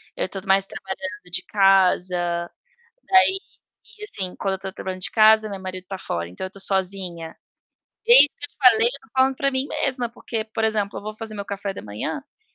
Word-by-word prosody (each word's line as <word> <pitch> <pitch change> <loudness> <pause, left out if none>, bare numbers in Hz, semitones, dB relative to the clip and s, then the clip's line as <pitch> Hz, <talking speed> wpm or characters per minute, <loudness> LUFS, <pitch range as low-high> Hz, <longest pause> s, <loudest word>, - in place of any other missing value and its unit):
Eu - - -2
tô 195 - -6
mais 195 0 +3
trabalhando 190 -1 -7
de 175 - -3
casa. 180 -3 +2 0.5
Daí 380 0 +5 0.6
e 425 - -8
assim, 190 - -4
quando 195 -1 -1
eu 190 - -5
tô 190 0 -6
trabalhando 185 0 -6
de - - 0
casa, 215 0 +5
meu 200 -1 -6
marido 185 -1 -7
tá 195 - -5
fora, 85 - -4
então 90 - -7
eu - - -16
tô 195 - -13
sozinha. 185 -4 -2 0.7
E 480 +1 +10
isso 290 - -2
que 290 - 0
eu - - -14
te - - -33
falei, 235 -4 +6
eu 270 +3 -2
tô - - -21
falando 265 0 +3
pra 275 +1 0
mim 260 +1 0
mesma, 255 -5 -1
porque, 230 -1 -5
por 220 0 -4
exemplo, 215 -2 -1
eu - - -8
vou 215 - -5
fazer 220 0 -7
meu 200 - -5
café 200 0 -5
da - - -8
manhã, 105 - -5
por 295 +9 -41
200 Hz, 220 wpm, -22 LUFS, 185-235 Hz, 0.7 s, E